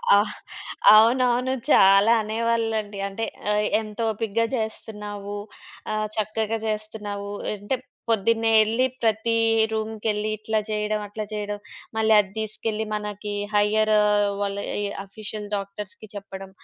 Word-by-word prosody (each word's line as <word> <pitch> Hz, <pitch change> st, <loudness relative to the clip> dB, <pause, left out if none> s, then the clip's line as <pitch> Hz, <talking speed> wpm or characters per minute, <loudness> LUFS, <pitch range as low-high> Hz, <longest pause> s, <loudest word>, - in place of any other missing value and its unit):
ఆ! -, -, +7 dB, 0.8 s
అవునవును. 250 Hz, +3 st, +4 dB, 0.2 s
చాలా 195 Hz, +2 st, +6 dB
అనేవాళ్ళండి. 220 Hz, -2 st, -1 dB
అంటే 200 Hz, +3 st, -3 dB, 0.3 s
ఆహ్, 210 Hz, 0 st, +2 dB
ఎంతొపికగా 225 Hz, 0 st, -1 dB
చేస్తున్నావు. 210 Hz, -2 st, -5 dB, 0.5 s
ఆహ్, 215 Hz, 0 st, -1 dB
చక్కగా 220 Hz, +1 st, -1 dB
జేస్తున్నావు. 210 Hz, -2 st, -4 dB, 0.3 s
అంటే 205 Hz, +6 st, -2 dB, 0.3 s
పొద్దున్నే 225 Hz, +1 st, +2 dB
ఎళ్లి 230 Hz, +4 st, +1 dB, 0.2 s
ప్రతి 225 Hz, +1 st, +1 dB, 0.4 s
రూమ్‌కెళ్లి 215 Hz, -1 st, -2 dB
ఇట్లా 215 Hz, +1 st, -1 dB
జేయడం 210 Hz, 0 st, -1 dB
అట్లా 215 Hz, +1 st, -5 dB
జేయడం. 205 Hz, -1 st, -3 dB, 0.4 s
మళ్ళీ 220 Hz, 0 st, +4 dB
అద్దీసుకెళ్ళి, 220 Hz, +2 st, -4 dB
మనకి 210 Hz, 0 st, -5 dB, 0.2 s
హైయ్యర్ 215 Hz, +1 st, +3 dB, 0.5 s
వాళ్ళ 200 Hz, 0 st, -1 dB, 0.3 s
ఈ -, -, 0 dB, 0.2 s
ఆఫీషియల్ 210 Hz, +1 st, -6 dB
డాక్టర్స్‌కి 200 Hz, +1 st, -5 dB
చెప్పడం. 195 Hz, -1 st, -8 dB
215 Hz, 105 wpm, -24 LUFS, 205-220 Hz, 0.8 s, ఆ